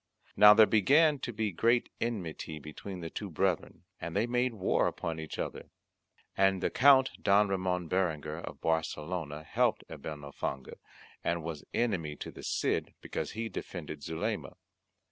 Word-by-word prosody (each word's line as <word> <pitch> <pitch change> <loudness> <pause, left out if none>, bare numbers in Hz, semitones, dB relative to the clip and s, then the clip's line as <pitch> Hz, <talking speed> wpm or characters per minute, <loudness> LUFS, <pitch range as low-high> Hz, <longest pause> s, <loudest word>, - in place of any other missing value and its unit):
Now 105 +1 +9
there 110 0 +8
began 145 - +4
to 125 - -4
be 110 -2 -1
great 115 +7 +2
enmity 90 -9 -3
between 85 +5 -8
the 80 -1 -6
two 105 - -5
brethren, 90 +1 -1 0.2
and 85 - -5
they 105 +3 +2
made 125 0 0
war 95 - +2
upon 80 -2 -3
each 80 -1 -6
other. - - -5 0.7
And 95 -1 +3
the - - +1
Count 135 0 +6
Don 100 +1 +4
Ramon 90 -2 -1
Berenguer 80 -4 -1
of - - -8
Barcelona 80 -1 -2
helped - - +1
Abenalfange, 70 -3 -6 0.5
and 85 -1 -1
was 80 -2 -5
enemy 90 -11 -1
to - - -7
the - - -11
Cid - - -1
because - - -4
he 115 +1 -3
defended 80 -8 -6
Zulema. 80 +2 -3
90 Hz, 150 wpm, -31 LUFS, 80-110 Hz, 0.7 s, Now